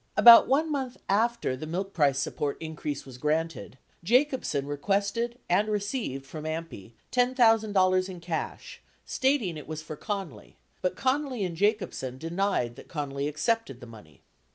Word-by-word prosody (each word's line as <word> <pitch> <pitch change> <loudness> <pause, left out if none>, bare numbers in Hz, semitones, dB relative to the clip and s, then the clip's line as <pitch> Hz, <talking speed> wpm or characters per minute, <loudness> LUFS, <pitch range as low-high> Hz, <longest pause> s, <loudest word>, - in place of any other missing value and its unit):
About 235 -1 +10
1 305 +4 +2
month 265 -3 -3
after 225 - +1
the 155 +4 -7
milk 190 +4 -3
price 145 -4 +3
support 140 +1 -2
increase 155 -3 -5
was 130 -2 -11
granted, 150 -5 -2 0.3
Jacobsen 250 - +1
requested 200 +11 -1
and 205 +5 +2
received 205 - -2
from 155 +2 -8
AMPI 155 - -6 0.2
$10,000 220 -7 +3
in 180 -2 -8
cash 165 -1 -5 0.2
stating 260 - 0
it 150 - -9
was 155 0 -6
for 155 0 -7
Connally, 195 - -6 0.3
but 180 0 0
Connally 260 -4 0
and 175 -2 -4
Jacobsen 195 - -1
denied 165 -6 -1
that - - -12
Connally 140 -2 -3
accepted 155 - -1
the 125 - -10
money. 105 - -15
180 Hz, 145 wpm, -28 LUFS, 145-225 Hz, 0.3 s, About